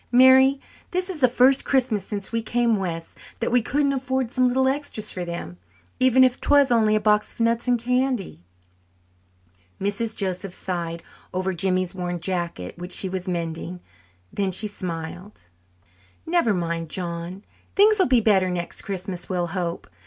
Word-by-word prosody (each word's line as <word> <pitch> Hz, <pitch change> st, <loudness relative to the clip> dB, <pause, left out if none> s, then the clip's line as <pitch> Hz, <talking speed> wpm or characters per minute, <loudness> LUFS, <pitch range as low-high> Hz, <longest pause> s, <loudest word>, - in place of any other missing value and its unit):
Mary, 260 Hz, +2 st, +6 dB, 0.3 s
this 365 Hz, +1 st, -1 dB
is 320 Hz, -5 st, -5 dB
the 255 Hz, -, +7 dB
first 255 Hz, +2 st, +4 dB
Christmas 245 Hz, -7 st, +1 dB
since 200 Hz, -1 st, -4 dB
we 230 Hz, 0 st, 0 dB
came 235 Hz, 0 st, +1 dB
west 170 Hz, -4 st, -5 dB, 0.2 s
that 230 Hz, -, -1 dB
we 245 Hz, 0 st, +4 dB
couldn't 280 Hz, +4 st, +1 dB
afford 260 Hz, -2 st, -1 dB
some 255 Hz, -1 st, +2 dB
little 260 Hz, +1 st, +2 dB
extras 265 Hz, -6 st, -3 dB
for 180 Hz, -, -4 dB
them, 170 Hz, -, -6 dB, 0.4 s
even 260 Hz, 0 st, +5 dB
if 255 Hz, -1 st, +2 dB
'twas 285 Hz, -2 st, +4 dB
only 220 Hz, -2 st, +4 dB
a -, -, +3 dB
box 210 Hz, 0 st, +2 dB
of -, -, -23 dB
nuts 230 Hz, +1 st, +1 dB
and 245 Hz, -1 st, +3 dB
candy." 250 Hz, -, -1 dB, 1.4 s
Mrs. 205 Hz, +3 st, -2 dB
Joseph 185 Hz, -1 st, -2 dB
sighed 170 Hz, -2 st, -4 dB, 0.3 s
over 185 Hz, +1 st, -1 dB
Jimmy's 185 Hz, 0 st, 0 dB
worn 175 Hz, -2 st, -4 dB
jacket 170 Hz, -, -3 dB
which 180 Hz, +1 st, -5 dB
she 190 Hz, -, +2 dB
was 185 Hz, 0 st, -5 dB
mending. 170 Hz, 0 st, -4 dB, 0.5 s
Then 195 Hz, -1 st, -1 dB
she 190 Hz, +4 st, 0 dB
smiled. 180 Hz, 0 st, -6 dB, 0.9 s
"Never 335 Hz, -8 st, +2 dB
mind, 170 Hz, -3 st, -2 dB
John. 175 Hz, +2 st, -5 dB, 0.3 s
Things 425 Hz, +1 st, +5 dB
will 375 Hz, -, +4 dB
be 250 Hz, -2 st, +4 dB
better 195 Hz, -4 st, +3 dB
next 175 Hz, -1 st, -3 dB
Christmas, 190 Hz, -2 st, -5 dB
we'll 180 Hz, -2 st, 0 dB
hope. 175 Hz, -3 st, -3 dB
205 Hz, 160 wpm, -24 LUFS, 180-255 Hz, 1.4 s, the